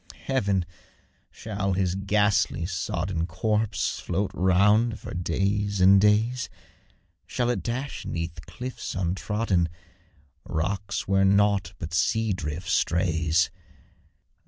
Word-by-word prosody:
Heaven! 100 -9 +1 0.6
shall 100 -3 -3
HIS 90 -1 +1
ghastly, 100 -2 +1
sodden 90 -2 -2
Corpse 105 +4 -1
float 95 +3 -2
round 105 +5 +3
for - - -8
days 100 +4 -1
and 95 +1 +7
days? 110 +4 +2 0.8
Shall 120 -1 0
it - - -2
dash 130 +4 -4
'neath 85 -1 -4
cliffs 130 -3 -6
untrodden, 95 0 0 0.7
Rocks 100 +4 -2
where 95 0 +3
nought 100 -2 +3
but 80 0 -6
sea 110 +4 +1
drift 80 0 -5
strays? 80 -2 +2
95 Hz, 105 wpm, -26 LUFS, 90-105 Hz, 0.8 s, and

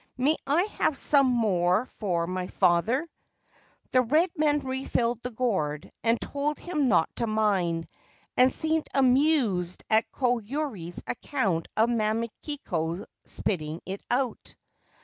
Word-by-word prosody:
May 280 +5 +3
I 305 +6 +3 0.2
have 290 - +2
some 280 -2 +4
more 210 -4 +2
for 175 -5 0
my 180 +1 -3
father? 200 - +2 0.4
' - - -35
The 255 - +5
red 310 +9 +2
man 300 -2 +2
refilled 255 -3 -1
the 250 - -4
gourd 190 -12 -2
and 230 0 +2
told 290 +1 -2
him 305 -6 -1
not 175 -8 +2
to 235 - 0
mind, 195 -6 +1 0.5
and 255 +1 +5
seemed 315 0 0
amused 255 - +2
at 220 +1 +3
Koyuri's 245 - -2
account 205 - -1
of 225 +2 +4
Mamikiko 215 - -2 0.2
spitting 160 -4 -2
it 195 +1 -6
out. 250 0 -2
230 Hz, 130 wpm, -27 LUFS, 185-275 Hz, 0.5 s, The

